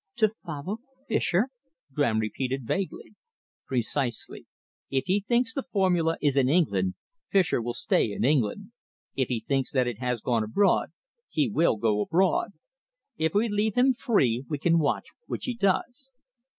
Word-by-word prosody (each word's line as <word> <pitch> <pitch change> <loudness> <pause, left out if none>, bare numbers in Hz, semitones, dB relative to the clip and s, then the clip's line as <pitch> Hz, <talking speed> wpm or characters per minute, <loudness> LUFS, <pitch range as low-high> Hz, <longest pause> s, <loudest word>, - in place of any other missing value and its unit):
"To 215 -2 +4
follow 180 0 -6 0.3
Fischer?" 215 +1 +1 0.4
Graham 130 -6 +1
repeated 125 +4 -2
vaguely. 190 - -3 0.5
"Precisely. 125 -1 -2 0.4
If 135 -1 0
he 190 +3 +2
thinks 230 +3 0
the 275 - -2
formula 180 -9 +1
is 145 -3 +1
in 130 -2 +4
England, 100 - +2 0.3
Fischer 185 -10 +2
will 120 +1 -3
stay 110 - +1
in 100 - -1
England. 145 - +1 0.4
If 130 -2 +1
he 120 -3 -1
thinks 135 +3 -1
that 130 -2 +3
it 120 -3 -4
has 125 -2 -1
gone 115 -3 +1
abroad 195 - +2 0.4
he 295 - +1
will 170 - +2
go 105 -1 +1
abroad. 190 - +1 0.6
If 160 +2 0
we 220 +3 +3
leave 210 0 0
him 260 +2 +4
free 130 - +1
we 150 - -1
can 165 +3 +3
watch 145 -3 0 0.2
which - - -4
he 250 - -1
does." 240 +6 -1
160 Hz, 155 wpm, -27 LUFS, 125-205 Hz, 0.6 s, To